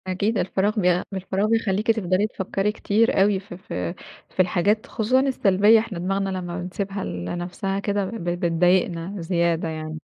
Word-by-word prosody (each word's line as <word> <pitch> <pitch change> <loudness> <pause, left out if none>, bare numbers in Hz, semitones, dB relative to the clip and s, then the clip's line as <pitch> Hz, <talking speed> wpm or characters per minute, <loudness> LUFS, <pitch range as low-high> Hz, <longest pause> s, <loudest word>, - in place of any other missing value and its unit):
أكيد، 200 +4 0
الفراغ 200 +4 0
بيع 180 -2 +2
الفراغ 195 +2 -1
بيخليكِ 220 -1 +2
تفضل 200 -2 +1
تفكري 195 0 -2
كتير 215 0 +2
أوي 200 -1 +3
في 190 -2 -10
في 90 - -4 0.4
في - - -21
الحاجات، 185 +4 +2
خصوصًا 230 +4 +1
السلبية. 220 -5 +4
إحنا 215 -5 -5
دماغنا 195 +2 -1
لمّا 180 -2 -4
بنسيبها 195 +2 -4
ل 90 0 -5
لنفسها 180 - -3
كده 200 0 -1
ب 220 0 -6 0.2
بتضايقنا 175 +1 +1
زيادة 170 -1 0
يعني. 155 0 -5
190 Hz, 155 wpm, -23 LUFS, 175-210 Hz, 0.4 s, السلبية